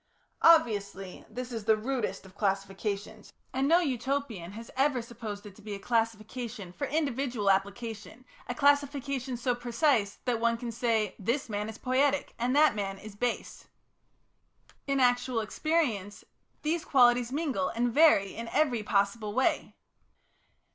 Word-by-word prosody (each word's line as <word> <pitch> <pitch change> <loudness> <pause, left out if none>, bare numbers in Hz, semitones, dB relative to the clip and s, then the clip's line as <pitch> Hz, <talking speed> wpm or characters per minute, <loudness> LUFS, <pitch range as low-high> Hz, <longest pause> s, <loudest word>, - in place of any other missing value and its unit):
Obviously, 205 - +3
this 250 +3 -6
is 225 -3 -5
the 220 -1 +4
rudest 240 -2 -3
of 190 - -14
classifications, 200 +1 -3 0.2
and 265 +1 +1
no 340 +4 +5
Utopian 255 - -2
has 225 +2 -9
ever 270 -1 +2
supposed 225 -3 -7
it 200 -2 -11
to - - -15
be 210 -1 -6
a - - -8
classification 225 -2 -2
for 280 - -3
individual 265 -8 0
application, 205 +5 -3 0.2
a 245 - -2
classification 280 -3 +1
so 245 +1 0
precise 240 -3 +1
that 245 -3 0
one 230 0 +2
can 235 0 -5
say, 225 -4 0
this 235 +6 -1
man 210 0 -2
is 220 - -8
"poietic," 275 +2 +1
and 250 +3 +1
that 305 +1 +6
man 195 -2 -3
is 210 +1 -11
"base." 245 +3 -3 1.2
In 275 0 +1
actual 245 -1 +2
experience 220 - -1 0.4
these 315 +2 0
qualities 245 -2 +4
mingle 280 -2 -1
and 240 0 -1
vary 280 -11 +5
in 230 +1 -5
every 260 -4 +1
possible 205 +1 0
way. 260 +4 0
235 Hz, 145 wpm, -29 LUFS, 210-270 Hz, 1.2 s, that